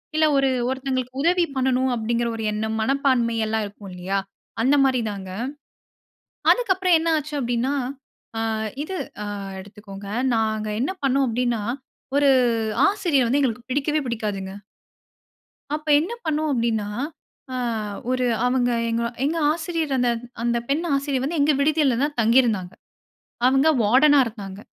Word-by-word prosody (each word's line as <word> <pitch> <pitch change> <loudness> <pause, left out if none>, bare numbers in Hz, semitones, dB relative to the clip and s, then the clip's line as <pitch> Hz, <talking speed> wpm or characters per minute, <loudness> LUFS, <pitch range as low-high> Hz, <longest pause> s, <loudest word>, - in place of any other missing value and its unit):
இல்ல 315 0 +4
ஒரு 275 0 +3 0.2
ஒருத்தவங்களுக்கு 260 -1 -3
உதவி 345 +3 +3
பண்ணணும் 260 0 +1
அப்டிங்கிற 235 +1 -1
ஒரு 225 - -4
எண்ணம் 220 +1 -2
மனப்பான்மை 260 -2 +1
எல்லாம் 220 0 0
இருக்கும் 200 -1 -10
இல்லயா? 185 +2 -2 0.4
அந்த 270 +4 +4
மாரி 255 -2 +2
தாங்க. 195 -2 -6 1.2
அதுக்கப்புறம் 380 -7 +2
என்ன 330 +1 0
ஆச்சு 300 0 -7
அப்டினா 245 +2 0 0.7
ஆ - - -1 0.4
இது 375 +4 -5 0.3
அ - - -4 0.3
எடுத்துக்கொங்க. 200 0 -10 0.3
நாங்க 220 -1 0
என்ன 275 - 0
பண்னோம் 275 0 +3
அப்டினா 240 -1 0 0.6
ஒரு 285 -1 +4 0.6
ஆசிரியர் 345 - +2
வந்து 265 +5 +2
எங்களுக்கு 250 -2 -2
பிடிக்கவே 295 +3 +1
பிடிக்காதுங்க. 205 -5 -3 1.2
அப்போஎன்ன 305 +4 +2
பண்ணோம் 310 0 0
அப்டின்னா, 230 -4 0 0.7
ஆ - - -2 0.5
ஒரு 255 0 +1 0.2
அவங்க 250 -1 +2 0.2
எங்க 230 +1 0 0.2
எங்க 310 +4 0
ஆசிரியர் 325 -2 -2
அந்த 245 -1 +2 0.3
அந்த 235 0 +1
பெண் 295 +5 0
ஆசிரியர் 275 -2 -1
வந்து 315 +4 -2
எங்க 290 +2 +4
விடுதியில 290 -3 +3
தான் 290 0 -1
தங்கியிருந்தாங்க. 225 -5 +3 0.8
அவங்க 270 +3 +4 0.2
வார்டனா 275 +7 +5
இருந்தாங்க. 200 -4 -7
255 Hz, 130 wpm, -23 LUFS, 225-290 Hz, 1.2 s, வார்டனா